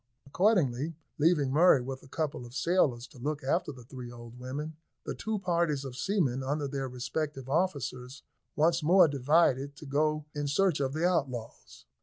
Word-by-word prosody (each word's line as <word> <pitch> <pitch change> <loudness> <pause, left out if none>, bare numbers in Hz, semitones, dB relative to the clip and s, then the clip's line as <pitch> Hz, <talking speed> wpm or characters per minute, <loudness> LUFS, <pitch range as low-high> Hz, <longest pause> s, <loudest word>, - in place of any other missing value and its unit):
Accordingly, 160 - +1 0.2
leaving 150 -4 +3
Murray 160 0 +6
with 130 +1 -6
a - - -16
couple 150 -2 -3
of 120 +1 -11
sailors 145 -9 +2
to 130 - -15
look 145 +3 -3
after 150 +3 0
the 130 -3 -12
three 125 0 -9
old 120 0 -11
women, 145 +5 -5 0.3
the - - -3
two 220 0 -3
parties 170 -7 0
of 130 -2 -7
seamen, 140 -7 0
under 145 +2 -1
their 135 -1 -3
respective 135 +2 -4
officers, 140 -5 -2 0.3
once 165 +2 +3
more 175 +3 +6
divided 140 0 +2
to 150 - -11
go 150 +2 0
in 145 -1 -2
search 170 +2 +2
of 135 -1 -1
the 160 +3 +2
outlaws. 130 -10 -3
145 Hz, 170 wpm, -30 LUFS, 130-165 Hz, 0.3 s, Murray